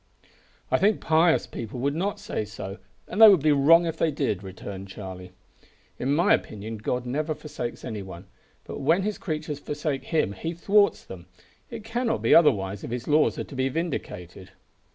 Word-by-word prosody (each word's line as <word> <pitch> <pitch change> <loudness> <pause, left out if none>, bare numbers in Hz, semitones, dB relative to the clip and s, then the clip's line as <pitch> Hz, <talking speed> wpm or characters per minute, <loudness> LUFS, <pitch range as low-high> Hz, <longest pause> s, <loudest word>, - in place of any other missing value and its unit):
"I - - +3
think 205 +2 +3
pious 160 +1 +3
people 115 +2 -7
would 140 +2 0
not 190 +6 -2
say - - -3
so, 100 -2 -8 0.3
and 215 - -2
they 220 - +12
would 185 -8 +4
be 155 - +4
wrong 160 +5 +5
if 165 -1 -3
they 165 - +2
did," 135 - -1
returned 95 0 -8
Charlie. 95 -2 -9 0.7
"In 135 +3 0
my 170 - +4
opinion 110 +1 -3
God 125 +3 -3
never 150 +5 -2
forsakes 125 -6 -6
any 110 -5 -5
one; 95 -1 -10 0.4
but - - -7
when 165 +7 +2
His 210 0 -3
creatures 155 -3 -4
forsake 150 -1 -3
him 155 - 0
He 165 - -5
thwarts 200 +4 +3
them. 90 -2 -11 0.4
It 230 -3 -7
cannot 230 +2 -2
be - - +4
otherwise 100 - +4
if - - -6
His 120 +1 -5
laws 150 +1 +3
are - - -2
to 140 - -11
be 130 +1 0
vindicated." 95 - -5
140 Hz, 185 wpm, -26 LUFS, 105-165 Hz, 0.7 s, they